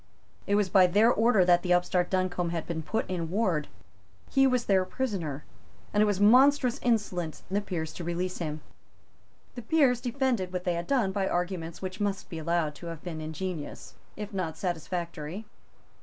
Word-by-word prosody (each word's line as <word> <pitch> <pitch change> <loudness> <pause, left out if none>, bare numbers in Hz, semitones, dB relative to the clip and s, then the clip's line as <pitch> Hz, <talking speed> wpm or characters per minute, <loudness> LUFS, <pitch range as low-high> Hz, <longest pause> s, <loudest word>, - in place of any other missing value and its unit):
It 200 - +2
was 205 -1 +2
by 185 -1 +6
their 210 +6 +4
order 220 -4 +4
that 175 -1 +5
the 180 0 +2
upstart 180 0 +1
Duncombe 185 -2 0
had 165 -2 -3
been 165 -2 -3
put 220 +8 -2
in 170 -3 -3
ward. 180 -7 0 0.6
He 270 0 +5
was 250 -2 +1
their 190 -2 +3
prisoner; 185 - -3 0.5
and 210 - +3
it 215 - +5
was 205 -2 0
monstrous 255 +4 +5
insolence 205 -9 -1
in - - -4
the 205 - +2
Peers 165 -6 -4
to 175 - -7
release 175 +2 -3
him. 155 -3 -4 0.9
The 245 - -7
Peers 250 -1 +3
defended 245 -7 -1
what 180 -1 -3
they 180 - 0
had 170 0 -4
done 245 -9 +2
by 195 -1 -1
arguments 175 -1 -3
which 185 +2 -5
must 200 -1 -2
be 165 - -5
allowed 165 -1 0
to 170 - -9
have 165 -2 -7
been 165 -3 -5
ingenious, 160 0 -6 0.2
if 210 0 -6
not 180 -5 -3
satisfactory. 175 +1 -4
185 Hz, 185 wpm, -28 LUFS, 170-210 Hz, 0.9 s, by